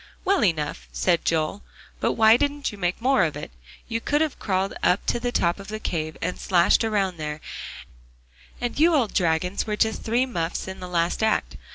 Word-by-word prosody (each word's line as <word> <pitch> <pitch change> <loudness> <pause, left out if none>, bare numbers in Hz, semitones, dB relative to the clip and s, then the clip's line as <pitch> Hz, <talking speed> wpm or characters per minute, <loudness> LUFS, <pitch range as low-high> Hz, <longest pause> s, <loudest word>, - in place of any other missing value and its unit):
"Well 390 0 +3
enough," 160 -6 -1
said 175 -3 +1
Joel, 160 +5 0 0.4
"but - - +1
why 220 0 +6
didn't 285 +1 -1
you 205 - -10
make 180 -1 -1
more 260 -2 +3
of 155 -3 -1
it? - - -7 0.4
You 230 0 -2
could 295 +5 +1
have 315 -3 -1
crawled 190 -1 -1
up 180 - +3
on 245 +1 -2
top 170 -4 +1
of 195 - -10
the 215 0 -5
cave, 155 -6 -3
and 180 +2 -2
slashed 175 +1 +3
around 200 -5 0
there; 150 -1 -4 1.2
and 245 +3 -3
you 330 +1 +5
old 240 -8 +1
dragons 180 +3 0
were 210 - -1
just 220 0 +1
three 235 +3 +1
muffs 175 -10 -3
in 190 0 -7
the 180 - -7
last 170 +2 0
act. 220 0 +1
195 Hz, 195 wpm, -24 LUFS, 170-235 Hz, 1.2 s, why